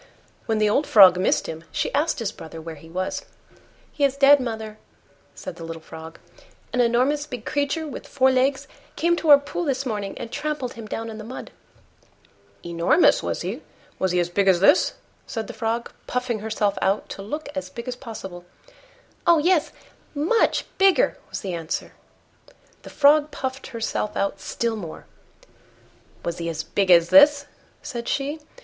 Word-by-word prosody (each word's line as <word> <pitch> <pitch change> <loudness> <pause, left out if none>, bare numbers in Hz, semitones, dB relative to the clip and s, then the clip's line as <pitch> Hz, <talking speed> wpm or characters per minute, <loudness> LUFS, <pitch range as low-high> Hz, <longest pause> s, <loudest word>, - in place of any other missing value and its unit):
When 225 - +1
the 215 0 +3
old 275 +8 +1
Frog 185 -4 +8
missed 185 - +1
him, 160 0 -6
she - - -2
asked 300 +4 +1
his 225 -5 -2
brother 165 -5 -10
where 165 0 -7
he 160 +1 -14
was. 185 +3 -3 0.7
"He 290 - -3
is 275 -1 +2
dead, 280 +1 +7
mother," 220 -3 -5 0.6
said - - -8
the 165 - -8
little 165 0 -6
Frog; 160 0 -10 0.6
"an 250 - +3
enormous 255 +5 +2
big 250 -6 -7
creature 290 +2 -1
with 290 - -8
four 265 -1 +3
legs 265 +1 +1 0.3
came 345 +1 +2
to 325 - -2
our 290 - +11
pool 285 +5 -4
this 275 -3 -1
morning 205 -5 -4
and 230 - -7
trampled 295 -5 -3
him 225 -2 -9
down 225 +1 -5
in 220 - -8
the - - -7
mud." 245 +4 -8 1.1
"Enormous, 170 - +3
was - - -3
he? - - -4 0.4
Was 190 - +1
he 180 - +2
as 175 0 -1
big 195 +2 +1
as 185 -2 +5
this?" 285 - +4 0.3
said 225 -2 -4
the - - -8
Frog, 230 +1 -2 0.2
puffing 250 -3 -2
herself 210 -1 -1
out 195 +2 +1
to - - -7
look 300 +10 -5
as 280 - -5
big 235 +1 -8
as 250 - -3
possible. 200 -8 -9 0.8
"Oh! 340 -1 +7
yes, 325 0 +2 0.4
much 330 +11 +2
bigger," 390 +5 +4
was - - -5
the 190 -4 -4
answer. 165 -2 -4 0.9
The - - -11
Frog 295 +1 +4
puffed 265 -2 -5
herself 225 -2 -3
out 195 0 -1
still 230 +2 -2
more. 175 -7 -8 1.2
"Was 170 0 -3
he 170 0 -3
as 160 -1 -3
big 195 -2 -1
as 170 -1 +6
this?" 285 0 +7 0.4
said 235 -5 -6
she. 285 +3 -2
235 Hz, 175 wpm, -23 LUFS, 195-285 Hz, 1.2 s, our